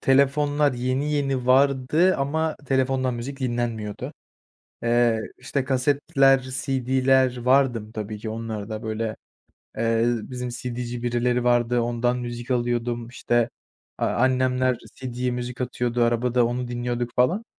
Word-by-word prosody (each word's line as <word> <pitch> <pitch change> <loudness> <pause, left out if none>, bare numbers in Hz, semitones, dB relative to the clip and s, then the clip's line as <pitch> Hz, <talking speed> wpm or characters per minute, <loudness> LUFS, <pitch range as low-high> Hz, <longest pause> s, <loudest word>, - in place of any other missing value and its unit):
telefonlar 145 +2 +3
yeni 130 +4 -1
yeni 135 -3 0
vardı 140 +7 +4
ama 155 +3 -1
telefondan 130 -1 +1
müzik 130 +4 -6
dinlenmiyordu. 120 -4 -3 0.7
Eee, 120 -1 +3 0.2
işte, 135 +2 -2
kasetler, 135 +1 +3
CD'ler 130 0 +1
vardım 125 -3 +2
tabii 110 -1 -5
ki, 110 - -5
onlarda, 110 -1 -5
böyle, 110 0 -3 0.6
eee, 115 0 +2
bizim 125 +1 -2
CD'ci 120 0 -5
birileri 120 0 0
vardı, 120 0 +3
ondan 120 +1 0
müzik 120 0 -6
alıyordum, 120 -1 -1
işte, 120 -1 0 0.5
aaa, - - +1
annemler 130 0 +2 0.2
CD'ye 125 -1 -3
müzik 125 0 -5
atıyordu, 120 -1 -1
arabada 120 +1 +2
onu 120 +1 -3
dinliyorduk 120 0 -2
falan. 175 - +2
125 Hz, 120 wpm, -24 LUFS, 120-130 Hz, 0.7 s, vardı